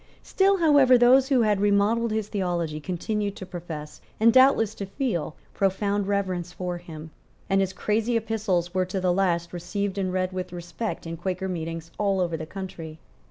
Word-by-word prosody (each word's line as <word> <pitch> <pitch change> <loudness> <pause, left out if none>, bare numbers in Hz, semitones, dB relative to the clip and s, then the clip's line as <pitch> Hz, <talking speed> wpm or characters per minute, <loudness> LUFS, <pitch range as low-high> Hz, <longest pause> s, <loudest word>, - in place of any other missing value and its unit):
Still, 390 0 +2
however, 285 -7 +6
those 255 +3 +5
who 260 -4 +4
had 210 -2 +2
remodelled 205 +3 +2
his 215 -1 -1
theology 175 -6 -2
continued 200 +5 -3
to 185 - -8
profess, 165 -4 -8 0.2
and 225 +1 +5
doubtless 255 -5 +5
to 200 - -6
feel, 195 - -2 0.2
profound 200 +1 0
reverence 185 -3 -1
for 180 -1 -4
him; 160 -2 -10 0.4
and 195 0 +2
his 190 -1 0
crazy 220 +4 0
epistles 210 -6 -1
were 185 0 +1
to 190 +1 -3
the 180 -1 +1
last 170 -3 0
received 190 +3 -3
and 185 -1 -1
read 185 0 -1
with 185 0 -4
respect 175 +6 -5
in 165 0 -5
Quaker 185 +2 -3
meetings 165 -2 -5
all 200 -2 +1
over 175 -2 0
the 160 0 -6
country. 175 -4 -7
190 Hz, 175 wpm, -25 LUFS, 175-215 Hz, 0.4 s, however